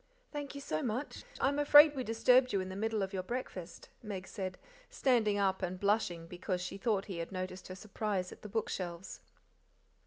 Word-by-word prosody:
"Thank 290 Hz, -1 st, -5 dB
you 280 Hz, -, -6 dB
so 155 Hz, -, -2 dB
much. 245 Hz, -, -3 dB
I'm 280 Hz, +2 st, +2 dB
afraid 295 Hz, +1 st, +8 dB
we 260 Hz, -, -2 dB
disturbed 250 Hz, +2 st, +4 dB
you 200 Hz, -, +2 dB
in 185 Hz, 0 st, -3 dB
the 190 Hz, -, -6 dB
middle 215 Hz, 0 st, 0 dB
of 190 Hz, +1 st, -4 dB
your 190 Hz, -, -1 dB
breakfast," 185 Hz, -5 st, -6 dB
Meg 195 Hz, -4 st, -6 dB
said, 190 Hz, -3 st, -5 dB, 0.3 s
standing 225 Hz, -6 st, +2 dB
up 190 Hz, -1 st, +1 dB
and 185 Hz, 0 st, -3 dB
blushing 200 Hz, -5 st, +1 dB
because 180 Hz, +2 st, -3 dB
she 180 Hz, +2 st, -5 dB
thought 205 Hz, -3 st, +1 dB
he 185 Hz, -4 st, -5 dB
had 165 Hz, -, -5 dB
noticed 185 Hz, 0 st, -5 dB
her 185 Hz, -, -7 dB
surprise 200 Hz, -2 st, -3 dB
at -, -, -12 dB
the 210 Hz, -, -8 dB
bookshelves. 185 Hz, -4 st, -3 dB
200 Hz, 190 wpm, -33 LUFS, 185-235 Hz, 0.3 s, afraid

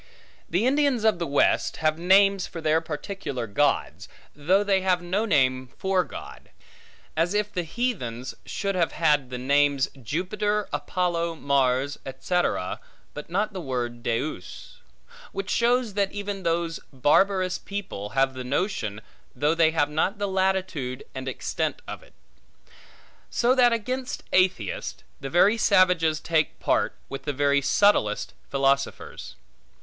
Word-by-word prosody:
The 180 Hz, +7 st, +1 dB
Indians 275 Hz, -3 st, +2 dB
of 220 Hz, -5 st, +3 dB
the 170 Hz, -, -2 dB
West, 140 Hz, -, +2 dB
have 155 Hz, 0 st, 0 dB
names 195 Hz, +2 st, +4 dB
for 165 Hz, -, -8 dB
their 160 Hz, 0 st, +2 dB
particular 155 Hz, -, -5 dB
gods, 140 Hz, +7 st, 0 dB, 0.3 s
though 180 Hz, +8 st, +2 dB
they 195 Hz, -2 st, +2 dB
have 180 Hz, -2 st, +1 dB
no 190 Hz, +5 st, 0 dB
name 130 Hz, -, +2 dB
for 190 Hz, -1 st, +1 dB
God: -, -, -10 dB, 0.7 s
as 170 Hz, +5 st, +1 dB
if 210 Hz, 0 st, 0 dB
the 180 Hz, -, 0 dB
heathens 160 Hz, -, -3 dB
should 200 Hz, -1 st, -3 dB
have 175 Hz, -3 st, 0 dB
had 150 Hz, -5 st, +2 dB
the 125 Hz, -, -5 dB
names 140 Hz, +1 st, +2 dB
Jupiter, 205 Hz, -, -1 dB
Apollo, 170 Hz, -2 st, -1 dB
Mars, 140 Hz, -1 st, +1 dB
etc., 135 Hz, -, -1 dB, 0.3 s
but 150 Hz, +2 st, -8 dB
not 205 Hz, +5 st, -1 dB
the 185 Hz, -, -5 dB
word 120 Hz, -4 st, -3 dB
Deus; 115 Hz, -4 st, -4 dB, 0.5 s
which 195 Hz, 0 st, -4 dB
shows 240 Hz, -2 st, +2 dB
that 200 Hz, -1 st, 0 dB
even 205 Hz, -1 st, -4 dB
those 170 Hz, -1 st, -1 dB
barbarous 185 Hz, +7 st, +2 dB
people 190 Hz, -, -6 dB
have 135 Hz, 0 st, +3 dB
the 130 Hz, -1 st, -6 dB
notion, 125 Hz, -, -2 dB, 0.3 s
though 145 Hz, +5 st, +2 dB
they 165 Hz, -1 st, +4 dB
have 150 Hz, -2 st, 0 dB
not 170 Hz, +7 st, 0 dB
the 205 Hz, 0 st, -1 dB
latitude 190 Hz, -9 st, -1 dB
and 130 Hz, 0 st, -6 dB
extent 130 Hz, -, -2 dB
of -, -, -7 dB
it. -, -, -21 dB, 1.1 s
So 245 Hz, +1 st, +2 dB
that 250 Hz, -2 st, +5 dB
against 250 Hz, +3 st, -3 dB
atheists, 185 Hz, -, 0 dB, 0.2 s
the 135 Hz, -, -5 dB
very 200 Hz, +8 st, +4 dB
savages 180 Hz, -7 st, +3 dB
take 160 Hz, -2 st, 0 dB
part, -, -, +1 dB
with 135 Hz, -, -7 dB
the 145 Hz, -, -1 dB
very 140 Hz, 0 st, +2 dB
subtlest 140 Hz, -, +2 dB, 0.2 s
philosophers. 140 Hz, 0 st, -1 dB
170 Hz, 140 wpm, -25 LUFS, 140-195 Hz, 1.1 s, that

